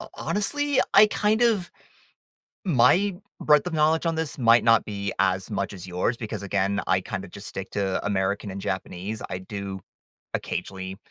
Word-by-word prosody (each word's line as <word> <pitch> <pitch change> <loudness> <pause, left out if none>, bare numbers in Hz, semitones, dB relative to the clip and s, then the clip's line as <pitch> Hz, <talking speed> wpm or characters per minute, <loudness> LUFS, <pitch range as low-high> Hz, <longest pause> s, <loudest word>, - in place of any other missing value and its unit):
ho - - -9
honestly, 285 +6 0
I 205 +2 +9
kind 210 +2 +1
of 215 -7 +2 0.9
My 180 +5 +4 0.3
breadth 150 +2 +4
of 180 - -3
knowledge 160 +2 +2
on 165 - +1
this 160 -3 -3
might 115 -2 +5
not 115 -1 +5
be 100 -1 -4
as 95 0 +1
much 100 - -2
as 95 -1 -9
yours 90 +7 -1
because, 110 -3 -5
again, 100 0 0
I 95 - +3
kind 95 +1 -5
of - - -12
just 100 +2 -10
stick 95 0 -6
to 95 -2 -1
American 100 0 -1
and 95 +1 -6
Japanese. 95 +3 -4
I 90 - -3
do 100 0 -6 0.6
occasionally 95 0 -5
105 Hz, 175 wpm, -25 LUFS, -, 0.9 s, I